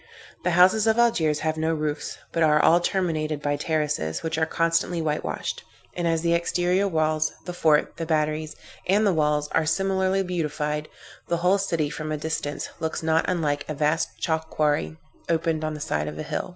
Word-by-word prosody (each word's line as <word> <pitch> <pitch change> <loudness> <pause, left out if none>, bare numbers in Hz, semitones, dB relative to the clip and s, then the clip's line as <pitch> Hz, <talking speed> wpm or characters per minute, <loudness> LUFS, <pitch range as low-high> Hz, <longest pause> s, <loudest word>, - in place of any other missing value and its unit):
The - - +1
houses 190 +5 +5
of 220 0 +3
Algiers 165 -11 +2
have 160 0 -1
no 160 +1 0
roofs, 150 -1 -3
but 165 - -1
are 150 -1 +5
all 170 +3 +5
terminated 160 -5 -1
by 145 0 0
terraces, 150 - -1
which 160 0 -2
are 160 - +2
constantly 165 +1 +1
whitewashed; 155 -2 -3 0.3
and 175 -1 -1
as 165 0 +1
the 170 0 +2
exterior 180 +3 +1
walls, 155 -3 +1
the 180 - -5
fort, 155 -3 +2
the 165 -1 -4
batteries 155 -1 0 0.3
and 205 +4 +3
the 200 - +3
walls 150 -2 +1
are 160 -1 +1
similarly 190 +2 +1
beautified, 150 -4 -2 0.4
the 170 - 0
whole 195 +2 +4
city, 165 -6 -1
from 155 0 -5
a 155 - -1
distance, 150 -1 -3
looks 160 0 -3
not 160 0 +2
unlike 150 -5 0
a 155 - -2
vast 150 +2 0
chalk 160 -1 -1
quarry 145 - 0 0.3
opened 160 -1 0
on 155 0 -2
the - - -7
side 75 - -2
of 75 0 -6
a - - -4
hill. - - -3
160 Hz, 190 wpm, -25 LUFS, 150-175 Hz, 0.4 s, houses